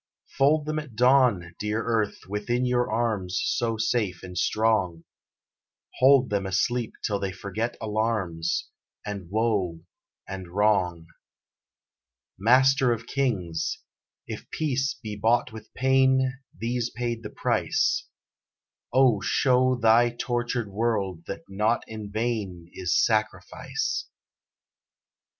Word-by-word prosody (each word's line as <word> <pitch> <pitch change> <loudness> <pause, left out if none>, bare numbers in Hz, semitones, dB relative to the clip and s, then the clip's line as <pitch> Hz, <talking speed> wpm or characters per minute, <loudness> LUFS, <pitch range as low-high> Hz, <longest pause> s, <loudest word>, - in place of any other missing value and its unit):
Fold 145 +2 +3
them 155 0 -1
at 145 -7 -10
dawn, 120 -8 +3
dear 105 +2 -1
earth, 110 -3 -1
within 110 +5 -1
your 125 0 +1
arms 105 -6 0
So 115 -2 0
safe 110 -5 -1
and 90 0 -8
strong: 95 -4 +1 1.0
Hold 130 -1 +5
them 100 -2 0
asleep 115 +5 0
till 100 -2 0
they 95 -1 -2
forget 105 +5 -4
alarms, 105 -7 -1 0.4
And 100 -4 -6
woe 100 -6 0 0.5
and 95 -2 -6
wrong. 90 -3 +1 1.3
Master 130 +4 +4
of 115 -1 -2
Kings! 105 -13 -1 0.5
If - - -8
peace 135 -3 -1
be 110 -4 -7
bought 115 +4 +2
with 110 0 -11
pain 130 0 +3 0.2
These 120 +1 -1
paid 120 -1 -3
the 105 - -7
price; - - 0 0.8
O 125 -6 +4
show 130 +2 +3
Thy 120 0 +4
tortured 120 -2 -2
world 100 -6 -1
that - - -6
not 105 +4 0
in 110 -2 -7
vain 100 -6 -3
Is 90 -2 0
sacrifice! 115 - -1
110 Hz, 115 wpm, -26 LUFS, 100-125 Hz, 1.3 s, Hold